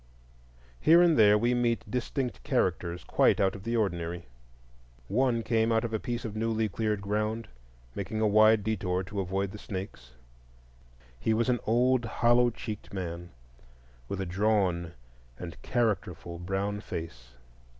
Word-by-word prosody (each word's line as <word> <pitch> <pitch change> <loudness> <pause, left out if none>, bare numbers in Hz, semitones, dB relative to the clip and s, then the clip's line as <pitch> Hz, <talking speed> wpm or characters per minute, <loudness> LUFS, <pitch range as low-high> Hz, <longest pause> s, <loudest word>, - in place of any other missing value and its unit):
Here 165 +2 +6
and 170 -2 +4
there 105 -3 +6
we 120 +3 +1
meet 120 -1 +1
distinct 125 +1 -3
characters 85 +1 -1
quite - - +3
out 95 -1 +2
of 100 - -8
the 115 +2 -2
ordinary. 85 -4 -2 0.8
One 120 +1 +1
came 115 0 +1
out 110 0 +2
of 115 - -4
a 110 - 0
piece 120 +1 -4
of 110 -2 -5
newly 110 0 0
cleared 105 0 -1
ground, 105 +3 -2 0.5
making 100 +5 -4
a 110 - +2
wide 110 0 +5
detour 95 -4 -1
to 100 +2 -5
avoid 95 +1 -1
the 105 - -9
snakes. 95 - -7 1.1
He 110 - +1
was 115 +3 +1
an 120 -1 +2
old, 120 +2 +3
hollow 120 +2 +3
cheeked 110 -2 -7
man, 85 -3 -5 0.8
with 100 - -4
a 95 - -2
drawn 90 -3 0 0.4
and 85 -2 -8
characterful 95 - -2
brown 100 +3 -2
face. 65 - -7
105 Hz, 150 wpm, -29 LUFS, 95-115 Hz, 1.1 s, Here